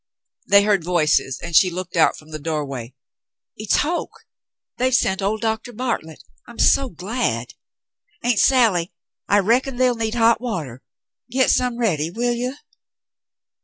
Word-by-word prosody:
They 200 0 +6
heard 205 -4 +2
voices, 150 -6 +1
and 170 -1 -4
she 185 - +6
looked 180 0 -6
out 165 - +3
from 155 - -16
the 155 - -6
doorway. 140 -5 -4 0.6
"It's 215 -1 0
Hoke. 340 +4 -4 0.5
They've 255 0 +2
sent 190 -4 +1
old 210 +3 -1
Doctor 225 +1 -2
Bartlett. 230 -10 -4 0.2
I'm - - -13
so 275 -1 +3
glad. 180 - -3 0.7
Aunt 240 -4 +1
Sally, 220 -10 +3 0.4
I 205 - +3
reckon 245 +6 +1
they'll 250 0 +2
need 225 -1 -3
hot 230 0 +3
water. 155 - -5 0.5
Get 260 +2 +2
some 250 -2 0
ready, 165 -10 0
will 240 +6 -1
you 250 +3 -3
205 Hz, 145 wpm, -21 LUFS, 165-245 Hz, 0.7 s, They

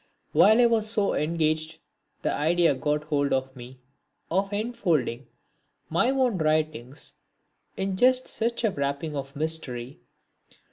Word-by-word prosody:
While 220 +3 +6
I 245 - +6
was 225 -2 +2
so 210 -3 +1
engaged, 155 0 -1 0.5
the - - 0
idea 165 +1 +2
got 150 +3 -1
hold 145 -2 0
of 130 0 -1
me 125 +1 -12 0.5
of 195 +3 0
enfolding 175 - -1 0.6
my 245 - +2
own 255 -7 +1
writings 155 -4 -1 0.6
in 195 0 -1
just 255 +3 +4
such 235 +1 -2
a 220 - +2
wrapping 140 +1 -3
of 140 0 -6
mystery. 140 -5 -2
155 Hz, 130 wpm, -26 LUFS, 140-205 Hz, 0.6 s, While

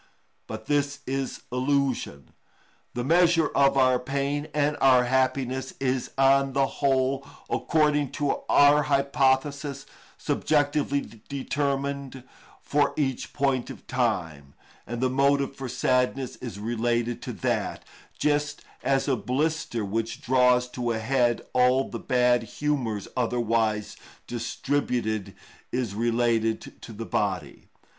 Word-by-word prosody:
But 110 0 -7
this 145 0 0
is 135 0 -3
illusion. 130 - -1 0.6
The 120 - -2
measure 165 +1 +4
of 140 0 +3
our 130 -1 +4
pain 140 +3 -2
and 150 0 +1
our 130 -2 +6
happiness 130 +1 0
is 130 -1 -1
on 135 0 +4
the 135 0 +3 0.2
whole, 135 -1 +2 0.3
according 150 -3 +2
to 145 -2 0
our 145 +1 +6
hypothesis, 140 0 +1 0.3
subjectively 145 -1 +1 0.3
determined 140 -1 -2 0.4
for 145 0 +1
each 135 -4 -1
point 135 -3 0
of - - -10
time, 80 - -2 0.3
and 120 0 -4
the 130 - +2
motive 140 +1 +2
for 135 -2 -6
sadness 130 +1 0
is 120 -5 -7
related 120 +2 -1
to - - -5
that, - - -2 0.3
just 145 0 0 0.2
as 135 +1 +1
a 135 - +2
blister 130 -2 -1
which 115 +3 -3
draws 125 0 +3
to 125 -1 -3
a - - -2
head 120 +1 +1
all 125 +1 +3
the 115 - -4
bad 125 0 +2
humours 120 -4 -2
otherwise 115 -3 0 0.3
distributed 120 -3 -2 0.4
is 120 -5 -2
related 115 0 0
to - - -9
the 115 +1 -6
body. 90 -6 -2
130 Hz, 120 wpm, -26 LUFS, 120-140 Hz, 0.6 s, our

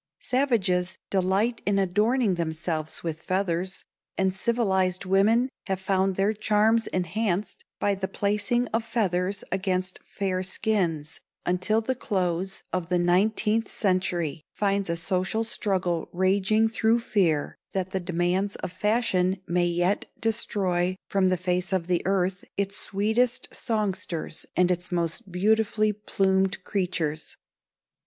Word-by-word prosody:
Savages 195 -9 +1
delight 195 +5 +1
in 200 0 +1
adorning 210 +4 +2
themselves 160 -1 -3
with 160 -2 -3
feathers, 185 0 -1 0.3
and 190 -1 +2
civilized 190 -4 +1
women 210 +6 +4 0.2
have 190 -2 -1
found 190 0 +1
their 195 +3 +2
charms 215 +1 +2
enhanced 185 +2 -1 0.2
by 205 - +2
the 190 -1 -2
placing 210 +5 0
of 225 +1 0
feathers 195 -4 0
against 185 -1 -1
fair 190 -2 -2
skins 180 -6 -1 0.3
until 185 +5 +1
the 260 +4 -1
close 190 -5 -2
of 180 -2 -2
the 180 - +2
nineteenth 210 +5 +2
century 180 -5 0
finds 200 -2 0
a 170 - 0
social 185 +6 0
struggle 185 -7 -1
raging 195 +4 +3
through 225 +1 +2
fear 180 -10 +1 0.2
that 190 -1 -2
the 190 - 0
demands 180 +2 0
of - - -5
fashion 190 -2 +1
may 175 0 +1
yet 175 +4 +1
destroy 190 -5 0
from 190 -2 +3
the 185 - +2
face 180 +1 -1
of 185 -3 +1
the 175 -1 +1
earth 190 0 +1
its 200 0 -1
sweetest 220 +5 0
songsters 200 -8 -2
and 180 0 +3
its 180 0 -2
most 175 +4 -2
beautifully 215 +3 +2
plumed 190 -2 0
creatures. 170 -6 -2
190 Hz, 130 wpm, -26 LUFS, 180-210 Hz, 0.3 s, women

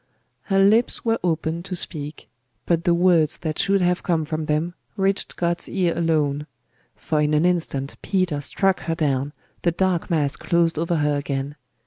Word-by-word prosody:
Her 195 - +1
lips 215 +6 +3
were 225 0 +1
opened 165 -1 -1
to 190 - -4
speak: 150 -3 -5 0.4
but 170 0 +1
the 175 - +4
words 170 -4 +3
that 155 -2 -4
should 195 -1 +2
have 180 0 +1
come 165 -3 0
from 155 0 -3
them 155 +3 0 0.2
reached 195 0 0
God's 170 0 -1
ear 180 -3 0
alone; 150 -3 0 0.5
for 155 -1 -1
in 150 0 +2
an 155 +3 +3
instant 160 -6 0
Peter 185 -7 0
struck 195 +6 +1
her 165 - +1
down, 140 -3 0 0.3
the 175 - +2
dark 180 0 0
mass 150 -5 +1
closed 170 -2 +1
over 170 +1 0
her 150 -2 +1
again.... 140 0 -3
165 Hz, 170 wpm, -23 LUFS, 150-180 Hz, 0.5 s, the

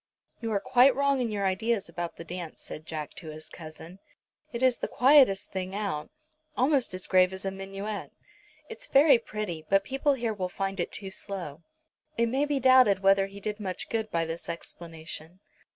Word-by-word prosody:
"You 225 -1 -3
are 205 - +2
quite 255 +2 +5
wrong 280 -1 +2
in 240 - 0
your 205 -2 -1
ideas 205 +3 0
about 170 0 -5
the - - -8
dance," 170 -1 -7
said 155 +1 -9
Jack 155 -2 -5
to 165 - -8
his 155 0 -9
cousin. 165 +3 -11 0.5
"It 235 0 -3
is 255 -2 +3
the - - -2
quietest 260 -6 +5
thing 190 0 -4
out, 200 -8 -3 0.5
almost 260 -6 +2
as 185 - -4
grave 185 -1 +4
as 190 +1 -7
a 195 - -1
minuet. 195 +2 -6 0.6
It's - - -8
very 275 - +6
pretty, 210 -8 -5
but 195 0 +4
people 270 +6 +1
here 235 -3 -2
will 185 -3 -3
find 195 +1 -3
it 175 - -1
too 195 -2 -6
slow." 185 -7 -5 0.6
It 235 0 +2
may 270 +4 +1
be 290 -1 0
doubted 255 -7 +6
whether 195 0 +5
he 200 +1 -11
did 210 +1 -4
much 190 -3 -4
good 220 -1 -1
by 165 -1 0
this 165 +1 -6
explanation. 165 0 -7
195 Hz, 190 wpm, -28 LUFS, 180-240 Hz, 0.6 s, very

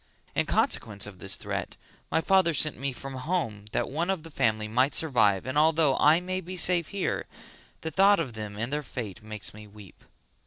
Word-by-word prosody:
In - - 0
consequence 100 -2 0
of 100 -3 -11
this - - -2
threat - - -4 0.3
my 160 - +2
father 190 -3 +3
sent 150 +1 +2
me 140 +1 -3
from 135 +2 -8
home 130 - -2
that - - 0
one 165 +6 -2
of 190 -5 -1
the 165 - -10
family 110 -5 +1
might 130 +6 +2
survive 115 - +3
and 130 +3 0
although 155 -3 +4
I 155 +3 +6
may 185 +1 -3
be 185 +1 -7
safe 175 -2 +1
here 200 -2 -2 0.5
the 160 - -3
thought 195 +4 +5
of 135 -8 -3
them 105 -2 -6
and 115 +6 -3
their 150 - 0
fate 115 -6 -6
makes 105 -4 -6
me 105 0 -11
weep." 100 -3 -15
140 Hz, 200 wpm, -28 LUFS, 110-165 Hz, 0.5 s, I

